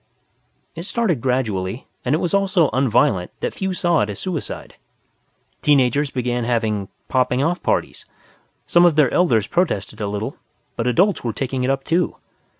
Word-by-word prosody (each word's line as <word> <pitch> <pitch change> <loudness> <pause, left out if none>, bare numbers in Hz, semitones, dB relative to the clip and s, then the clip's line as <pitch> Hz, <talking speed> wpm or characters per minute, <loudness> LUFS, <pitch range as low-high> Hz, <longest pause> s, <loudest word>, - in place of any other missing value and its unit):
It 165 - -7
started 195 - 0
gradually, 115 -4 -1 0.2
and 130 +4 +1
it - - +2
was 175 +2 -2
all 200 0 +3
so 175 -6 +2
un 130 0 +2
violent 110 -6 +2
that - - -2
few 190 -1 -2
saw 175 -3 +1
it 105 - 0
as 100 - -5
suicide. 180 -5 -5 0.8
Teen 145 -2 +5
agers 140 +3 +1
began 125 -2 -2
having 110 -4 -1 0.2
"Popping 130 0 +1
off 175 +4 0
parties". - - -1 0.6
Some 175 - +4
of 175 -3 +5
their 150 -5 +3
elders 120 - +3
protested 110 - -1
a 105 - -1
little, 105 +2 -4 0.4
but 115 - -2
adults 185 - +2
were 115 -2 -2
taking 130 -1 -2
it 125 - 0
up 135 0 0
too. 170 +2 0
130 Hz, 175 wpm, -21 LUFS, 115-170 Hz, 0.8 s, Teen